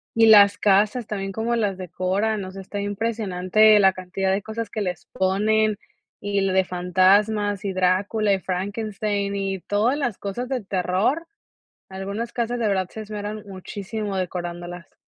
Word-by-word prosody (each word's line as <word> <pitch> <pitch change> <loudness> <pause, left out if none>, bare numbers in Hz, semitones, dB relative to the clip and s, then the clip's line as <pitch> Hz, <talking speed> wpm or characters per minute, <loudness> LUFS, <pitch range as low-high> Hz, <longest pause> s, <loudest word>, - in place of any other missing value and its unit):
Y 225 0 +5
las 205 -2 +7
casas 210 +4 +2
también, 195 -2 -4
cómo 225 +4 -1
las 205 -4 0
decoran, 190 +4 -1
o 185 - -8
sea, 195 0 -8
está 200 +2 -6
impresionante 210 0 +2
la 190 -1 +5
cantidad 190 +1 -2
de 195 +1 0
cosas 220 0 -5
que 215 - -4
les 180 -3 -4
ponen, 210 +3 +1 0.4
y 205 0 -2
l 195 -1 +1
de 190 0 +4
fantasmas, 195 +3 +2
y 195 - -1
Drácula, 195 +3 +1
y 195 - 0
Frankenstein, 200 +2 -2
y 195 -1 -2
todas 220 +7 +1
las 245 -9 -2
cosas 205 +5 -4
de 260 -3 -1
terror. 195 - 0 0.6
Algunas 200 +5 -5
casas, 240 0 -2
de 225 - +1
verdad, 190 -2 0
se 220 - -8
esmeran 210 0 -6
muchísimo 200 +1 -5
decorándolas. 175 -1 -5
200 Hz, 160 wpm, -23 LUFS, 190-215 Hz, 0.6 s, las